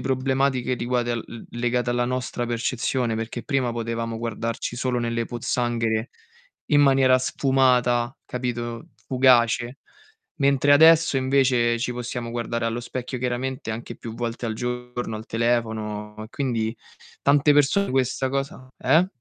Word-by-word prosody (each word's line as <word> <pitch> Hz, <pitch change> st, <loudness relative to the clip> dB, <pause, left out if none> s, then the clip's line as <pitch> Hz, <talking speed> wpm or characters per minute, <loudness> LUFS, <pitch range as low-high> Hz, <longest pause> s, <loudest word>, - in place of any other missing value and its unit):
problematiche 130 Hz, -1 st, 0 dB
riguadel 120 Hz, -1 st, -1 dB
l 115 Hz, -, -9 dB, 0.2 s
legate 120 Hz, 0 st, 0 dB
alla 120 Hz, 0 st, +1 dB
nostra 125 Hz, -1 st, -2 dB
percezione, 120 Hz, 0 st, -1 dB
perché 115 Hz, +2 st, -4 dB
prima 135 Hz, -5 st, 0 dB
potevamo 115 Hz, 0 st, -3 dB
guardarci 115 Hz, +1 st, -4 dB
solo 125 Hz, -1 st, -1 dB
nelle 115 Hz, 0 st, -1 dB
pozzanghere 120 Hz, -1 st, -1 dB, 0.6 s
in 145 Hz, -1 st, +4 dB
maniera 135 Hz, -2 st, +5 dB
sfumata, 125 Hz, -2 st, +2 dB
capito, 120 Hz, -2 st, -4 dB, 0.2 s
fugace. 125 Hz, -1 st, +3 dB, 0.6 s
Mentre 140 Hz, -1 st, +3 dB
adesso 160 Hz, 0 st, +6 dB
invece, 130 Hz, -3 st, +2 dB
ci 125 Hz, +1 st, -1 dB
possiamo 120 Hz, -1 st, -5 dB
guardare 115 Hz, 0 st, -2 dB
allo 115 Hz, +1 st, -2 dB
specchio 125 Hz, +1 st, -5 dB
chiaramente 125 Hz, 0 st, -3 dB
anche 115 Hz, +2 st, -7 dB
più 115 Hz, -1 st, -8 dB
volte 120 Hz, 0 st, -4 dB
al 110 Hz, -, -2 dB
giorno, 125 Hz, -1 st, -4 dB
al 110 Hz, +1 st, -9 dB
telefono, 110 Hz, -2 st, -1 dB
e -, -, -12 dB
quindi 115 Hz, -3 st, -2 dB, 0.5 s
tante 145 Hz, +1 st, +4 dB
persone 145 Hz, +8 st, +3 dB
questa 130 Hz, 0 st, 0 dB
cosa 135 Hz, -1 st, -4 dB
eh? 170 Hz, +3 st, +4 dB
120 Hz, 130 wpm, -24 LUFS, 115-130 Hz, 0.6 s, adesso